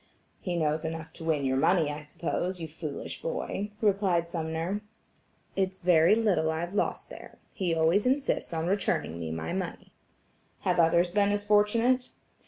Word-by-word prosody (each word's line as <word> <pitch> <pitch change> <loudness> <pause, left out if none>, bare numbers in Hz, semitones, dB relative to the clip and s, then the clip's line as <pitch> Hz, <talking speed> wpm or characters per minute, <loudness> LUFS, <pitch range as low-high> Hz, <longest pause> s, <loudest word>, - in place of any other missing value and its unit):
"He 180 -2 -3
knows 155 -1 0
enough 160 0 -5
to - - -10
win 155 -4 0
your 130 0 +1
money, 160 +1 +3
I 150 +1 -6
suppose, 175 +4 -3
you 165 - -4
foolish 155 -2 -6
boy," 475 - -3
replied 195 -5 +2
Sumner. 165 +4 -3 0.7
"It's 190 -1 0
very 175 +1 +5
little 205 -8 +2
I've 170 +3 -3
lost 205 - -1
there. - - -11 0.2
He 175 -4 0
always 165 +8 +3
insists 270 +2 0
on 165 -1 -2
returning 180 - 0
me 80 -1 -4
my 80 0 -4
money." - - -5 0.7
"Have - - +1
others 170 +1 +4
been 200 +1 +3
as 205 0 0
fortunate?" 230 +5 +3
170 Hz, 160 wpm, -28 LUFS, 160-200 Hz, 0.7 s, very